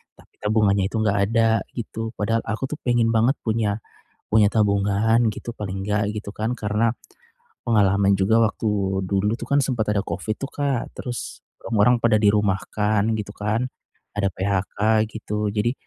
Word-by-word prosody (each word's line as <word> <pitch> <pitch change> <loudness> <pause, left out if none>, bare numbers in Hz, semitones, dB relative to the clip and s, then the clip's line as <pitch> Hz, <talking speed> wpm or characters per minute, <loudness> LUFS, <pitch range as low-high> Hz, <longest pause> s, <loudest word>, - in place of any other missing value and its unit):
Tapi - - -22
tabungannya 105 -2 +2
itu - - -3
enggak 100 -1 +1
ada, 115 -1 +3 0.3
gitu. 115 -1 -5
Padahal 115 +2 0
aku 115 +4 -2
tuh 150 - -4
pengen 120 -2 +2
banget 115 +5 +3
punya 110 -2 0 0.5
punya 105 -1 +5
tabungan 105 +2 +2
gitu, 120 - -7
paling 95 -1 -5
enggak 105 0 0
gitu 105 -1 -5
kan, 110 +2 -1
karena, 105 +2 +1 0.7
pengalaman 100 -3 +3
juga 100 +4 +3
waktu 100 -3 0
dulu 100 +3 +1
tuh - - -7
kan 140 - +4
sempet 120 -5 -1
ada 100 - +1
covid 110 0 -3
itu - - -4
Kak, 140 -4 -2
terus, 120 -1 -6 0.2
orang-orang 115 +2 +3
pada 110 -2 +4
dirumahkan 105 0 +1
gitu 100 0 -6
kan, 105 +4 -1 0.5
ada 100 -1 +1
PHK 100 +3 +1
gitu. 105 -1 -2
Jadi, 115 +3 +1
105 Hz, 155 wpm, -23 LUFS, 100-115 Hz, 0.7 s, punya